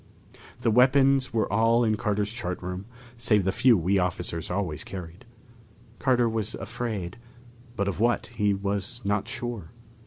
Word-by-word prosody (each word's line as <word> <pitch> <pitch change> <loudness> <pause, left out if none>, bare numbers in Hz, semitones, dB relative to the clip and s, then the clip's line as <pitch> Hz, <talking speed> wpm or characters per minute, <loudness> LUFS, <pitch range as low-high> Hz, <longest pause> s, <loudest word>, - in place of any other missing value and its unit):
The 115 - +2
weapons 135 +2 +4
were 110 -1 +1
all 115 +3 +4
in 110 -2 +2
Carter's 105 0 -1
chart 90 -7 -4
room, 90 +2 -5 0.3
save 105 -4 +3
the 95 - +1
few 120 +3 +5
we 95 +3 +2
officers 90 -2 -2
always 90 -5 -2
carried. 90 +4 -9 0.7
Carter 125 -3 +3
was 110 -1 -2
afraid, 105 -5 -4 0.6
but 100 -2 -1
of 100 -2 -2
what, 120 +2 +2
he 105 -3 +1
was 100 +4 -3
not 105 +1 0
sure. 120 -8 -4
105 Hz, 150 wpm, -26 LUFS, 95-120 Hz, 0.7 s, few